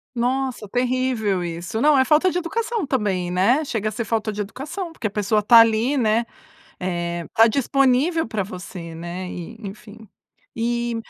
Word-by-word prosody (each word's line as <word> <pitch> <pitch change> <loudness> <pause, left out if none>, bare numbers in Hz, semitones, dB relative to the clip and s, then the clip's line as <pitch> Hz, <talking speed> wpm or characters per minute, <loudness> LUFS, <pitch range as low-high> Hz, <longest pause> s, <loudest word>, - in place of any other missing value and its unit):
Nossa 250 -2 -1
terrível 245 -5 0
isso, 170 +5 -4
não 295 -1 +5
é 260 - +5
falta 310 +7 +4
de 350 - -5
educação 435 +2 -2
também, 195 -9 -1
né. 230 - +2
Chega 220 -5 -2
a 215 - -4
ser 235 - -3
falta 220 0 -1
de 210 0 -3
educação 305 - -6
porque 235 - -4
a - - -1
pessoa 210 +1 0
está 230 +3 +7
ali, 230 +5 +3
né, 230 -1 +2 0.5
eh 175 -2 -3
está 225 +1 +4
disponível 275 +6 +2
pra 220 -3 -2
você, 180 -3 -8
né, 175 +2 -6
e 180 +6 -7
enfim. 210 +1 -10 0.5
E 235 +1 -1
225 Hz, 170 wpm, -22 LUFS, 195-260 Hz, 0.5 s, está